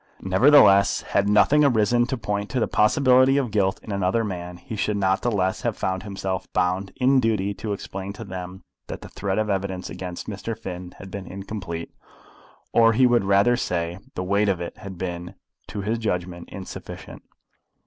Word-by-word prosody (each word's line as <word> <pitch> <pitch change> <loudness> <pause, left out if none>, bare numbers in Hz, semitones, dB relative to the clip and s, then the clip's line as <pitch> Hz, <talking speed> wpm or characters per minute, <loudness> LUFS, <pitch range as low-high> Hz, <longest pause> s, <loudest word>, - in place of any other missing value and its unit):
Nevertheless, 100 0 +5
had 100 0 +3
nothing 140 +8 +5
arisen 120 -2 +3
to 130 - -2
point 105 -2 -3
to 130 - -1
the - - +1
possibility 130 +4 +4
of 130 -5 0
guilt 95 -2 +1
in 110 - -7
another 100 +3 +1
man, 90 -3 -5
he 90 +5 -8
should 105 0 -1
not 95 -1 +1
the 120 - +1
less 95 -4 0
have 120 -3 -2
found 95 0 -1
himself 95 -2 -4
bound 95 +2 0
in 130 +1 +4
duty 105 -4 0
to 100 +2 -5
explain 95 -1 -5
to 110 - -8
them 95 -1 -7 0.2
that - - -6
the - - -10
thread 95 -1 -3
of 110 - +2
the 105 - 0
evidence 95 -1 -3
against 90 -1 -6
Mr. 110 +1 -5
Finn 90 -1 -7
had 95 -1 -10
been 95 -2 -6
incomplete, 95 -4 -6 0.8
or, 115 -1 +5
he 130 +3 +4
would 120 -4 +3
rather 100 +5 +4
say, 85 -5 -2 0.2
the 90 - -2
weight 100 +2 +2
of 95 -3 0
it 85 - -6
had 100 -3 -8
been, 90 +1 -5 0.3
to 105 - -5
his 110 +4 -1
judgment, 90 -5 -3
insufficient. 95 -2 -9
100 Hz, 190 wpm, -24 LUFS, 95-110 Hz, 0.8 s, Nevertheless